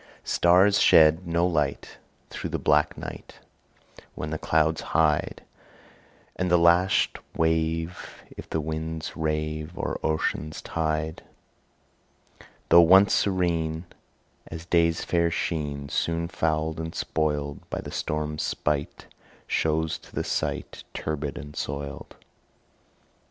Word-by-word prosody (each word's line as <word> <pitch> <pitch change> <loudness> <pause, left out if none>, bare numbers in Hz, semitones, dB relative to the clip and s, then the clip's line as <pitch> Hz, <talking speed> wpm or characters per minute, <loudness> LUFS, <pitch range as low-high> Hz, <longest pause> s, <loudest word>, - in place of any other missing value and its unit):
Stars 95 +4 +4
shed 80 +3 +5
no 85 +1 +2
light 75 -6 -1 0.3
Through - - -5
the - - -2
black - - +2
night, - - -9 0.8
When 75 - -5
the 80 - -3
clouds 80 0 +1 0.2
hide; 75 -2 +1 0.9
And 90 0 -1
the 90 - +5
lashed 85 +2 +3 0.2
wave, 80 +1 -1
If - - -10
the 80 - -1
winds 80 +1 -4
rave 75 +1 -3
O'er - - -3
ocean's 80 0 -1
tide, 80 -1 -2 1.5
Though 85 +1 +9
once 95 +4 +6
serene 85 -4 0 0.6
As 80 0 -8
day's 85 -1 +2
fair 85 -1 +2
sheen, 75 -4 -3
Soon 85 +3 -1
fouled 80 -1 -1
and 80 0 -5
spoiled 75 -2 -1
By - - -3
the - - -8
storm's 75 0 -3
spite, 75 -1 -2 0.4
Shows 80 0 0
to - - -17
the - - -1
sight - - -3
Turbid 75 -2 -3
and 75 0 -9
soiled. 70 0 -5
80 Hz, 115 wpm, -26 LUFS, 75-85 Hz, 1.5 s, Though